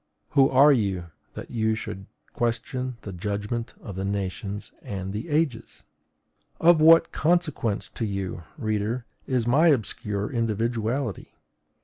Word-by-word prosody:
Who 135 -1 +5
are 140 +3 +7
you, 95 -8 -1 0.2
that - - -8
you 110 -1 +1
should 100 -3 -6 0.3
question 120 +2 -2
the 100 -2 -7
judgment 105 +5 -3
of 100 - -8
the 95 - -3
nations 100 +1 -3
and 95 -1 -5
the 110 +11 -5
ages? 145 -6 -1 0.8
Of 165 -1 +6
what 165 +1 +7
consequence 155 - 0
to 115 - -3
you, 95 -3 -4 0.2
reader, 110 +3 -1 0.2
is 125 -3 +1
my 140 +8 +4
obscure 105 -6 0
individuality? 115 0 -1
115 Hz, 125 wpm, -26 LUFS, 100-130 Hz, 0.8 s, are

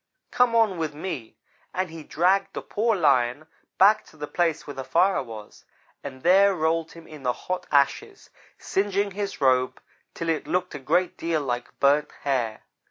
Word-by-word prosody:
Come 245 -1 +3
on 215 -6 +3
with 155 -2 -3
me'; 155 -8 -6 0.4
and 185 -2 -1
he 165 -1 -8
dragged 180 +6 +1
the - - -5
poor 225 +1 0
Lion 130 -4 +2 0.3
back 205 +4 +5
to - - -19
the 150 - -4
place 165 +1 -1
where 145 - -7
the 135 - -6
fire 185 +8 +2
was, 110 -5 -11 0.4
and 130 -2 -8
there 195 +2 +5
rolled 160 0 0
him 165 -1 -13
in 150 -2 -11
the 125 -2 0
hot 185 +7 -5
ashes, 395 - 0 0.3
singeing 200 0 -1
his 200 -4 -5
robe 130 -1 +2 0.4
till 165 - -3
it 160 -2 -1
looked 180 0 -1
a - - -6
great 170 +7 0
deal 165 -2 -1
like 120 -3 -4
burnt 140 +1 +3
hair. 125 -6 -1
165 Hz, 175 wpm, -25 LUFS, 140-190 Hz, 0.4 s, back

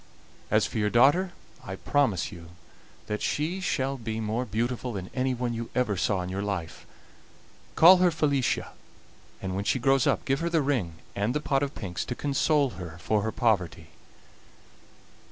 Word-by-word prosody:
As - - +3
for - - -3
your 105 0 +2
daughter, 145 - +4 0.3
I 95 - -6
promise 110 - 0
you 85 -1 -11 0.6
that 105 0 -3
she 160 +6 -1
shall 135 -6 -1
be 110 -2 -4
more 110 +3 -1
beautiful 120 +2 -2
than 95 -2 -6
anyone 125 -2 -1
you 115 0 -5
ever 125 -5 +1
saw 95 +1 0
in 90 - -5
your 95 +1 -3
life; 100 -5 -4 0.9
call 180 +3 +9
her 180 0 +4
Felicia, 145 -5 0 0.7
and 95 -1 -3
when 100 - -2
she 115 - +1
grows 135 +1 +3
up - - +1
give 135 +1 +1
her 170 - -1
the 165 -3 +2
ring 125 - 0 0.2
and 105 +5 -1
the - - +2
pot 135 -2 0
of 140 0 -2
pinks 90 -5 -4
to 125 - -4
console 145 0 +1
her 85 -2 -8
for 100 +5 0
her 110 +2 -2
poverty. 90 -9 0
120 Hz, 170 wpm, -27 LUFS, 100-140 Hz, 0.9 s, call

